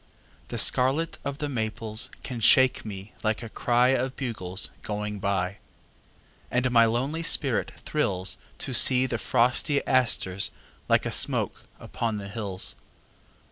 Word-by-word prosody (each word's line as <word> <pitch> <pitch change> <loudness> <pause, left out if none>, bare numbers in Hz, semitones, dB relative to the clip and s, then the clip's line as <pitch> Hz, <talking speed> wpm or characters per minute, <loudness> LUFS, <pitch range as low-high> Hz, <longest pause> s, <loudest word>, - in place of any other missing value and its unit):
The - - -5
scarlet 140 +6 +2
of 140 0 -4
the 150 -1 -3
maples 110 -3 -2
can 125 -3 -5
shake 130 +3 +4
me 100 -1 -8
like 110 +2 -1
a 115 - -7
cry 120 +3 +2
Of 130 0 0
bugles 105 -7 -4
going 105 0 -4
by. 100 -1 -1 0.9
And 125 +1 0
my 115 -1 +6
lonely 130 +8 -1
spirit 140 -6 +2
thrills 95 -11 -2 0.2
To 130 - -4
see 125 +3 +7
the 120 -3 -3
frosty 125 +4 +1
asters 110 -7 +2 0.4
like - - +3
a - - -2
smoke - - 0
upon 115 -2 -3
the 100 -1 -7
hills. 100 -3 -3
115 Hz, 140 wpm, -26 LUFS, 105-130 Hz, 0.9 s, see